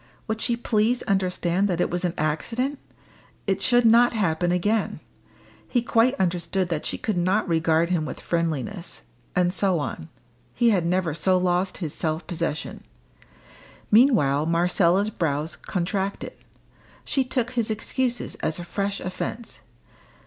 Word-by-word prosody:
Would 220 0 -2
she 235 -1 +1
please 235 +1 +1
understand 190 -2 +1
that 175 -3 -1
it - - +1
was 175 +1 -2
an 175 -1 -1
accident? 230 - -1 0.7
It 195 -1 0
should 245 +3 +4
not 235 +2 +6
happen 175 -5 +1
again. 205 +4 0 0.7
He 245 -3 +1
quite 235 +3 +3
understood 180 0 0
that 160 -3 -2
she - - -2
could 210 -5 -1
not 190 +5 +1
regard 165 0 +2
him 170 -4 +1
with 155 - -6
friendliness. 165 - -3 0.3
And 180 0 +2
so 190 -2 +2
on. 145 - -5 0.5
He 235 -1 +4
had 180 -5 +1
never 180 -2 0
so 185 +4 +2
lost 180 +1 0
his 150 - -4
self 160 +1 -2
possession. 165 -4 -3 1.1
Meanwhile 205 - +4
Marcella's 175 +4 +2
brows 155 -3 -2
contracted. 195 +1 -3 0.7
She 270 - +1
took 250 -1 -2
his 235 -3 -1
excuses 240 +2 -2
as 155 - -1
a 175 - -6
fresh 200 +3 -3
offence. 220 +5 -5
185 Hz, 140 wpm, -24 LUFS, 170-220 Hz, 1.1 s, not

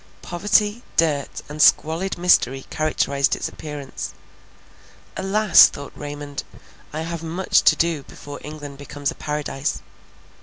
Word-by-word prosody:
Poverty, 205 +5 +1 0.2
dirt, 150 -4 0
and 150 +1 -4
squalid 165 +7 +3
misery 135 -7 +3
characterized 140 -3 +1
its - - -3
appearance. 145 -3 -7 1.0
Alas! 195 0 +6
thought 140 0 -9
Raymond, 145 -1 -6 0.5
I 155 - -4
have 165 0 -4
much 170 +3 +1
to - - +5
do 165 -3 0
before 145 +1 -10
England 145 -2 -8
becomes 145 0 -3
a - - -7
Paradise. 150 -1 -3
150 Hz, 120 wpm, -22 LUFS, 145-170 Hz, 1.0 s, Alas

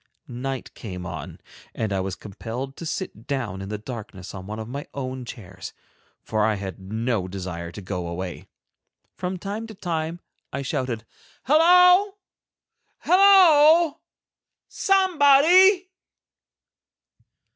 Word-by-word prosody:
Night 130 +2 -5
came 90 -4 -8
on, - - -7 0.4
and 110 -3 -2
I 95 - 0
was 95 0 -3
compelled 120 +6 -7
to 165 - -6
sit 145 - -5
down 120 -9 -3
in 95 - -7
the 105 - -3
darkness 105 -4 -9
on 95 -1 -8
one 105 +1 -6
of 110 -1 -6
my 140 +4 -6
own 130 -2 -5
chairs, 95 -6 -9 0.5
for 110 -1 -1
I 110 0 +2
had 95 -1 -7
no 110 +1 -2
desire 90 -3 -6
to 105 - -9
go 90 -2 -4
away. 90 +1 -6 0.7
From 185 0 -4
time 205 +5 -5
to 220 - -11
time 165 -2 -3 0.3
I 140 +1 -4
shouted, 125 -4 -3 0.4
"Hallo, 360 - +5 0.8
hallo, 340 -5 +6 0.7
somebody." 370 +1 +4
130 Hz, 125 wpm, -24 LUFS, -, 0.8 s, hallo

